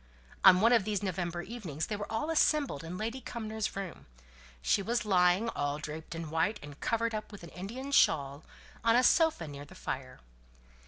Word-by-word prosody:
On 185 Hz, -1 st, +8 dB
one 230 Hz, +2 st, +5 dB
of 230 Hz, -4 st, +5 dB
these 205 Hz, -1 st, -2 dB
November 175 Hz, -2 st, -2 dB
evenings 180 Hz, -9 st, -5 dB
they 215 Hz, -, -3 dB
were 205 Hz, +1 st, -6 dB
all 225 Hz, +9 st, -1 dB
assembled 300 Hz, -, +2 dB
in 170 Hz, +2 st, -6 dB
Lady 230 Hz, +6 st, -3 dB
Cumnor's 220 Hz, -3 st, -4 dB
room. 195 Hz, -3 st, -6 dB, 0.5 s
She 65 Hz, -, +2 dB
was 230 Hz, +2 st, -1 dB
lying, 185 Hz, +2 st, +3 dB
all 145 Hz, -7 st, -2 dB
draped 155 Hz, +2 st, -7 dB
in 165 Hz, -2 st, -6 dB
white, 165 Hz, +7 st, +1 dB
and 145 Hz, 0 st, -10 dB
covered 230 Hz, 0 st, 0 dB
up 215 Hz, +1 st, -5 dB
with 205 Hz, -4 st, -11 dB
an 170 Hz, -, -9 dB
Indian 235 Hz, +10 st, -6 dB
shawl, 145 Hz, -, +3 dB, 0.4 s
on 230 Hz, 0 st, +4 dB
a 250 Hz, -, +5 dB
sofa 320 Hz, -, +3 dB
near 145 Hz, -1 st, -8 dB
the 145 Hz, -, -14 dB
fire. 130 Hz, -1 st, -5 dB
195 Hz, 190 wpm, -31 LUFS, 160-230 Hz, 0.5 s, On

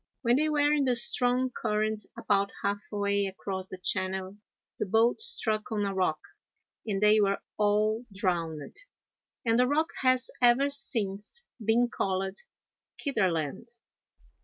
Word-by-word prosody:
When 240 Hz, +1 st, +3 dB
they 310 Hz, +2 st, +2 dB
were 295 Hz, -1 st, +3 dB
in 290 Hz, -2 st, +2 dB
the 250 Hz, -1 st, +2 dB
strong 250 Hz, +2 st, +2 dB
current 215 Hz, -2 st, -2 dB
about 200 Hz, -1 st, +1 dB
half 200 Hz, 0 st, -1 dB
way 200 Hz, -1 st, 0 dB
across 190 Hz, 0 st, -5 dB
the 185 Hz, -, -8 dB
channel, 185 Hz, +1 st, -2 dB, 0.4 s
the 215 Hz, -, -1 dB
boat 225 Hz, -, +3 dB
struck 220 Hz, -, +3 dB
on 210 Hz, -2 st, 0 dB
a 200 Hz, -, -2 dB
rock 180 Hz, -5 st, 0 dB, 0.7 s
and 200 Hz, -2 st, -1 dB
they 210 Hz, 0 st, +5 dB
were 200 Hz, -1 st, +2 dB, 0.2 s
all 215 Hz, +3 st, +1 dB
drowned, 170 Hz, -6 st, -2 dB, 0.7 s
and 230 Hz, +1 st, +3 dB
the 250 Hz, -, +4 dB
rock 310 Hz, +4 st, +1 dB
has 255 Hz, -1 st, +2 dB
ever 250 Hz, +4 st, +4 dB
since 225 Hz, -, -3 dB, 0.2 s
been 230 Hz, +3 st, +3 dB
called 190 Hz, -4 st, -2 dB, 0.6 s
Kitterland. 185 Hz, -, -1 dB
210 Hz, 135 wpm, -28 LUFS, 195-245 Hz, 0.7 s, they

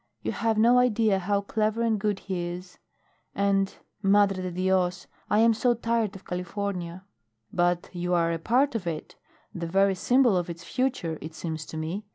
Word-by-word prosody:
"You -, -, -1 dB
have 225 Hz, -1 st, 0 dB
no 240 Hz, +3 st, +6 dB
idea 220 Hz, -5 st, +3 dB
how 200 Hz, +2 st, 0 dB
clever 215 Hz, +2 st, 0 dB
and 225 Hz, -2 st, +1 dB
good 205 Hz, -1 st, -1 dB
he 180 Hz, -3 st, -3 dB
is. 180 Hz, +1 st, -8 dB, 0.6 s
And 195 Hz, -1 st, +2 dB, 0.3 s
Madre 200 Hz, -1 st, +3 dB
de 185 Hz, -, -3 dB
Dios! 185 Hz, 0 st, 0 dB, 0.2 s
I 210 Hz, -, +3 dB
am 230 Hz, 0 st, +5 dB
so 240 Hz, +2 st, +2 dB
tired 230 Hz, -3 st, -1 dB
of 195 Hz, -, -12 dB
California." 180 Hz, -1 st, -4 dB, 0.5 s
"But 175 Hz, 0 st, +1 dB
you 180 Hz, 0 st, -1 dB
are 170 Hz, -1 st, +2 dB
a 165 Hz, -, -3 dB
part 255 Hz, -, +2 dB
of 210 Hz, -6 st, -3 dB
it 160 Hz, -2 st, -5 dB, 0.4 s
the 170 Hz, -2 st, -4 dB
very 195 Hz, +3 st, +3 dB
symbol 245 Hz, +3 st, +3 dB
of 175 Hz, -1 st, -2 dB
its 170 Hz, +1 st, -7 dB
future, 245 Hz, -, -2 dB
it 160 Hz, +1 st, -8 dB
seems 160 Hz, -1 st, -5 dB
to 160 Hz, -, -7 dB
me. 175 Hz, +7 st, -4 dB
195 Hz, 185 wpm, -27 LUFS, 175-220 Hz, 0.6 s, no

